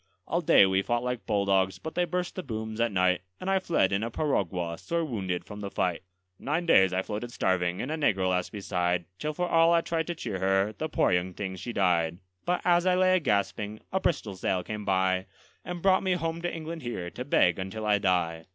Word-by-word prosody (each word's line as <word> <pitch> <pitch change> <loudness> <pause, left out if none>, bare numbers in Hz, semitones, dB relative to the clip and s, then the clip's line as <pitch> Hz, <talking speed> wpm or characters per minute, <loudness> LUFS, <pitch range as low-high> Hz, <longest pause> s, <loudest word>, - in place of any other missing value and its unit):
All - - 0
day - - +6
we 95 0 +2
fought 120 +4 -1
like 125 -1 -3
bulldogs, 95 -3 +2
but 160 - -7
they 180 - +1
burst 180 +1 -2
the 185 - -4
booms 110 -5 -4
at 115 -1 +2
night; 90 -1 +2 0.2
And 190 - -2
I 190 - +3
fled 165 - +1
in 100 +1 +1
a 115 - -2
piragua, 90 - -1
sore 170 -1 -1
wounded, 95 - -3
from 105 -1 -9
the 100 -1 -5
fight. 90 -3 -1 0.4
Nine 160 +5 -1
days 95 - +5
I 95 +1 0
floated 110 +4 -5
starving, 90 -3 0
and 135 - -4
a - - 0
negro 95 -11 +1
lass 90 -1 0
beside, 90 -4 -1
Till 150 - -2
for 180 +2 -1
all 165 0 +4
I 170 0 +4
tried 165 -1 -2
to 175 - -3
cheer 100 - -4
her, 95 +2 +2
the 155 +6 -4
poor - - +2
young 90 0 0
thing 95 -2 -4
she 120 +6 -6
died; 85 -5 +1 0.3
But 180 0 0
as 175 0 +4
I 180 - +4
lay 185 0 +4
a - - +3
gasping, 105 - -1
a 190 - +2
Bristol 135 - -1
sail 90 0 -1
came 105 +2 -6
by, 95 -1 +1 0.4
And 175 -1 -6
brought 190 -1 +4
me 190 -1 +1
home 165 -1 -2
to 175 - -2
England 165 0 -6
here, 90 -9 -5
to 125 - -6
beg 90 -10 +3
until 95 +3 -5
I 105 -1 +3
die. 85 -4 0
105 Hz, 230 wpm, -28 LUFS, -, 0.4 s, day